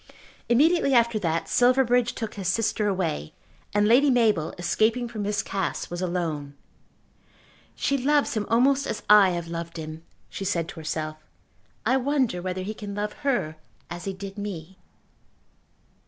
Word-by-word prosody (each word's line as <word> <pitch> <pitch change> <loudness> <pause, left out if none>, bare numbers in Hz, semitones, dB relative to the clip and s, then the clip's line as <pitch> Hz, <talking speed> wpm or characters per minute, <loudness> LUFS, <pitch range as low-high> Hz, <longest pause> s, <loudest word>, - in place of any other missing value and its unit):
Immediately 280 +3 +4
after 235 -2 +3
that 165 -4 -1
Silverbridge 245 -1 +3
took 225 -2 -4
his 195 -3 -5
sister 215 0 +1
away, 170 - -2 0.4
and 205 0 +2
Lady 260 +6 +5
Mabel, 215 - +2
escaping 220 +8 +1
from 225 -3 -6
Miss 205 0 -1
Cass, 195 -3 -3
was 175 +1 -4
alone. 165 -6 -3 1.2
"She 275 0 0
loves 290 +2 +2
him 215 -3 -2
almost 270 +4 +3
as - - -4
I 205 -2 +8
have 170 -2 -3
loved 170 0 -6
him," 155 0 -7 0.3
she - - -6
said 175 -4 -1
to 165 - -8
herself. 155 0 -4 0.7
"I 260 - +3
wonder 260 -8 0
whether 185 0 -3
he 210 +3 -4
can 205 -2 -7
love 210 0 -2
her 240 - -1 0.3
as 175 0 -6
he 195 - -2
did 195 +1 -8
me?" 190 -3 -7
205 Hz, 155 wpm, -25 LUFS, 175-240 Hz, 1.2 s, I